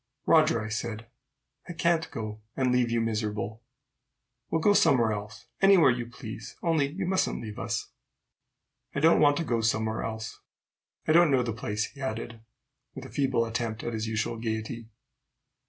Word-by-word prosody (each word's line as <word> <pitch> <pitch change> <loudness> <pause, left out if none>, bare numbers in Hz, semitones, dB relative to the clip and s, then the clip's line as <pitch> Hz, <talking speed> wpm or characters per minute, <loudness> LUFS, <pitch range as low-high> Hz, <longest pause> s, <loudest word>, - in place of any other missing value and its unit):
"Roger," 155 -6 +5
I - - -5
said, 110 0 -4 0.6
"I - - -4
can't 165 0 +1
go, 110 -5 -6 0.2
and 130 -2 +2
leave 125 -1 +2
you 115 0 +1
miserable. 110 -1 -2 0.9
We'll 165 - +1
go 205 +5 +4
somewhere 130 - +4
else, 105 +4 -7 0.2
anywhere 195 -8 +7
you 120 0 -3
please, 120 -2 -9
only 160 -4 +2
you 180 +7 -4
mustn't 190 +1 0
leave 105 -2 -7
us." - - -3 1.0
"I - - +1
don't 160 +3 +5
want 145 -1 +5
to 170 - 0
go 120 -7 0
somewhere 110 0 0
else. 110 0 -5 0.7
I - - +4
don't 170 0 +6
know 130 -3 +3
the 115 -2 -2
place," 105 -1 -2
he 140 - -13
added, 115 -2 -4 0.6
with - - -7
a - - -9
feeble 135 -4 +1
attempt 115 -1 -3
at 120 - -3
his 110 0 -2
usual 110 +1 -2
gayety. 110 0 -4
115 Hz, 170 wpm, -28 LUFS, 110-145 Hz, 1.0 s, anywhere